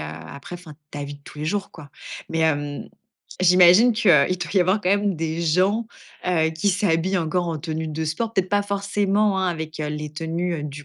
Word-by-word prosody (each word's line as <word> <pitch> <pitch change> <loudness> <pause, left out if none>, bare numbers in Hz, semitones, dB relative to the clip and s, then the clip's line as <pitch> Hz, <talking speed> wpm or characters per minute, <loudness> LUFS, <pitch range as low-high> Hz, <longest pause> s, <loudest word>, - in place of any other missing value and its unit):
après, 80 - -9
enfin 170 -4 -13 0.2
ta 145 - -6
vie 145 0 -7
de 145 - -16
tous - - -12
les 150 - -4
jours, 200 +4 -2
quoi. 150 -3 -12 0.4
Mais, 165 - -2
hem, 145 -2 -1 0.5
j'imagine 180 +6 +6
qu'il 215 -3 +3
doit 170 +3 +3
y 195 - +5
avoir 185 +4 +2
quand 180 - +1
même 200 -2 +1
des 160 +1 -3
gens, 185 +7 +1 0.4
heu, 160 -3 +2
qui 160 +5 -1
s'habillent 185 -1 +1
encore 175 +1 -1
en 165 - -2
tenue 160 +1 -4
de 155 +1 -3
sport? 170 +9 -2
Peut-être 190 -3 0
pas 205 0 +2
forcément, 200 0 0
hein, 190 -1 +1
avec 160 -2 -5
les 150 0 -4
tenues, 165 +2 -3
heu, 150 - -5
du 145 0 -8
170 Hz, 205 wpm, -23 LUFS, 155-190 Hz, 0.5 s, j'imagine